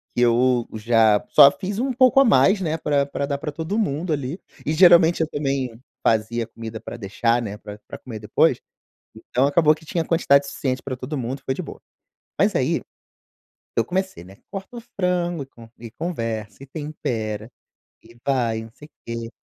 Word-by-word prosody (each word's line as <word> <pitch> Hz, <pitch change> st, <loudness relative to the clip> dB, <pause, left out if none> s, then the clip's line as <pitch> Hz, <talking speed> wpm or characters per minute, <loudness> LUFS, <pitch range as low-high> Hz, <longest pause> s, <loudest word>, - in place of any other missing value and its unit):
que 120 Hz, -, +1 dB
eu 120 Hz, 0 st, +3 dB
já 110 Hz, -1 st, +3 dB
só 140 Hz, -2 st, +9 dB
fiz 200 Hz, +2 st, -5 dB
um 265 Hz, +1 st, 0 dB
pouco 255 Hz, +2 st, +5 dB
a 275 Hz, -, +6 dB
mais, 200 Hz, -3 st, +4 dB
né, 160 Hz, -2 st, -1 dB
pra 145 Hz, -3 st, +1 dB
pra 140 Hz, 0 st, -3 dB
dar 140 Hz, -1 st, -2 dB
pra 150 Hz, -1 st, -4 dB
todo 165 Hz, +8 st, -3 dB
mundo 160 Hz, -3 st, -1 dB
ali, 140 Hz, +5 st, -4 dB, 0.3 s
e 150 Hz, -, 0 dB
geralmente 170 Hz, -1 st, +6 dB
eu 160 Hz, -, +1 dB
também 135 Hz, -6 st, -2 dB, 0.3 s
fazia 115 Hz, +1 st, +1 dB
comida 115 Hz, -1 st, -8 dB
pra 120 Hz, -, -8 dB
deixar 115 Hz, +3 st, 0 dB
né, 105 Hz, -2 st, -5 dB
pra 105 Hz, 0 st, -10 dB
pra -, -, -8 dB
comer 115 Hz, -4 st, -8 dB
depois, 105 Hz, -, +2 dB, 0.6 s
então 125 Hz, +4 st, 0 dB
acabou 155 Hz, +1 st, +4 dB
que 160 Hz, 0 st, -17 dB
tinha 165 Hz, 0 st, -1 dB
a -, -, -9 dB
quantidade 140 Hz, -4 st, +3 dB
suficiente 130 Hz, -2 st, -3 dB
pra 130 Hz, -2 st, -4 dB
todo 150 Hz, +3 st, -5 dB
mundo, 130 Hz, +2 st, -4 dB
foi 130 Hz, -, 0 dB
de -, -, -5 dB
boa. -, -, -10 dB, 0.6 s
Mas -, -, +3 dB
aí, -, -, +1 dB, 1.0 s
eu 115 Hz, -, +3 dB
comecei, 190 Hz, -, -3 dB
né, 95 Hz, +1 st, -15 dB
corta 195 Hz, +4 st, -7 dB
o -, -, -7 dB, 0.2 s
frango 175 Hz, -5 st, 0 dB, 0.3 s
e 115 Hz, -1 st, -8 dB
conversa 115 Hz, -, -4 dB
e -, -, -9 dB
tempera 120 Hz, -7 st, -4 dB, 0.5 s
e 115 Hz, +1 st, -18 dB
vai 120 Hz, -5 st, 0 dB
não 115 Hz, -, -12 dB
sei 150 Hz, -, -14 dB
o -, -, -44 dB
quê 115 Hz, 0 st, -5 dB
140 Hz, 190 wpm, -22 LUFS, 115-160 Hz, 1.0 s, só